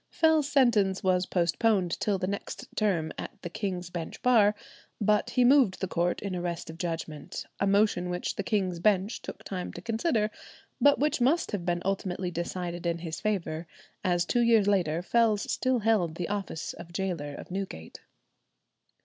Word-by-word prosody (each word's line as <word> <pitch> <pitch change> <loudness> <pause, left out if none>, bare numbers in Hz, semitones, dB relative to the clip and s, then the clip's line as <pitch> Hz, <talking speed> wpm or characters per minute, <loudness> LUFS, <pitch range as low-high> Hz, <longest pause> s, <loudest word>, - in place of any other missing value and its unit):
Fell's 315 -3 +3
sentence 215 -9 +3
was 185 -1 +2
postponed 180 +1 +1
till 205 -2 +1
the 185 - -2
next 200 +2 -5
term 175 -7 +1
at - - -7
the 175 - -5
King's 180 -3 -3
Bench 170 -2 -5
Bar; 215 -4 +5 0.4
but 210 +2 +2
he 245 +1 +3
moved 255 -7 +5
the 190 - -1
court 175 +1 0
in 195 -2 -3
arrest 175 -2 -3
of 165 - -13
judgment, 165 -4 -4
a 200 - +2
motion 200 -3 +2
which 180 0 -2
the - - -2
King's 190 -6 -1
Bench 200 +3 +1
took - - -8
time 185 -2 -4
to - - -7
consider, 225 -1 0 0.5
but 285 0 +6
which 295 -2 +1
must 300 +8 +2
have 190 -5 -3
been 175 0 0
ultimately 185 -2 -2
decided 175 0 -3
in 170 0 0
his 165 -1 -6
favour, 175 -6 -2 0.4
as 175 -2 +2
two 240 - +1
years 230 -3 +4
later 175 -5 +1
Fells 220 0 +2
still 255 0 +1
held 210 -8 +1
the 170 -1 -3
office 200 -6 -3
of 170 - -11
gaoler 170 -6 -3
of - - -10
Newgate. 185 - -5
190 Hz, 175 wpm, -28 LUFS, 175-215 Hz, 0.5 s, but